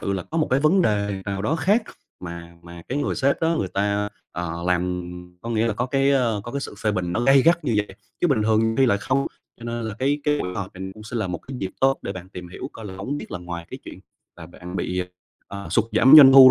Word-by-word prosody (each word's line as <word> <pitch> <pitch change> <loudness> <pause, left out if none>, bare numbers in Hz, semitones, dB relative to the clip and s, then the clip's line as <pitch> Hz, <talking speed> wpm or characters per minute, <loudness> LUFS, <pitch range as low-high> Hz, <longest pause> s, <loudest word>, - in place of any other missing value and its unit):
sự 100 - -2
là 95 - -2
có 165 - -4
một 155 - +2
cái 130 +2 +3
vấn 180 +6 +4
đề 100 - 0
nào 100 -1 -3
đó 155 +10 0
khác 200 +9 +2 0.4
mà 85 -1 -8
mà 85 0 -11
cái 135 - -1
người 145 - -1
sếp 140 +1 +1
đó 165 +1 +2
người 95 - -1
ta, 100 +1 0 0.2
ờ, 85 -1 -4
làm 90 0 -1 0.3
có 115 - -5
nghĩa 115 0 +1
là 115 - +1
có 120 +3 -1
cái, 135 +1 +2
ơ, 120 -6 +2
có 120 - -7
cái 140 - -2
sự 135 - -6
phê 110 - +1
bình 90 -3 -2
nó - - 0
gay 135 +2 +5
gắt 170 +1 +3
như 125 - 0
vậy, 105 -2 -2 0.2
chứ - - +3
bình 130 -7 +2
thường 110 +1 +2
thì 135 - +4
lại 100 -4 +2
không. 130 +6 0 0.3
Cho - - -9
nên 120 0 -3
là 110 -2 -4
cái 140 +3 +1
cái 150 0 +2
buổi 90 0 -4
họp 95 -1 -5
này 95 +1 -6
cũng 110 - -12
sẽ 110 +3 -6
là 110 -3 -1
một 90 -2 -4
cái 130 -1 -9
dịp 95 -4 -3
tốt 135 0 +3
để 100 - -4
bạn 95 -1 -9
tìm 90 -2 -9
hiểu 130 +9 -7
coi 110 - -10
là 95 - -8
hổng 115 +10 -4
biết - - -9
là 90 - -3
ngoài 85 -1 -7
cái - - -7
chuyện - - -10 0.4
mà 85 -1 -10
bạn 90 +1 -9
bị, 90 0 -1 0.5
ờ, 100 0 -7
sụt 115 - +3
giảm 130 +4 +5
doanh 135 -3 +10
thu 130 -1 +10
110 Hz, 280 wpm, -23 LUFS, 95-135 Hz, 0.5 s, doanh